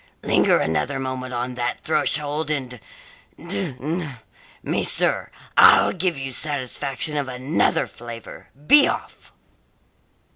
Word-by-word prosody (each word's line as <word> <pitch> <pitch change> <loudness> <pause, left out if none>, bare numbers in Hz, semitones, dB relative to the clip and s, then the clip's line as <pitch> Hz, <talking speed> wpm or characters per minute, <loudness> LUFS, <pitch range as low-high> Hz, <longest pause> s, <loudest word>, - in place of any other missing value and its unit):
"Linger - - +3
another 80 - -1
moment 130 -1 -4
on 125 +1 -3
that 120 0 -3
threshold, 150 0 0
and 130 -5 -3 0.6
d 100 +6 -3
n 155 -1 -4 0.5
me, - - -1
sir, - - +2 0.3
I'll - - +6
give 180 -2 -1
you 135 0 -4
satisfaction 140 +1 -2
of 140 -2 -2
another 135 +6 0
flavour! 115 -1 -11 0.2
Be 290 - +7
off!" - - -6
135 Hz, 115 wpm, -22 LUFS, 125-150 Hz, 0.6 s, Be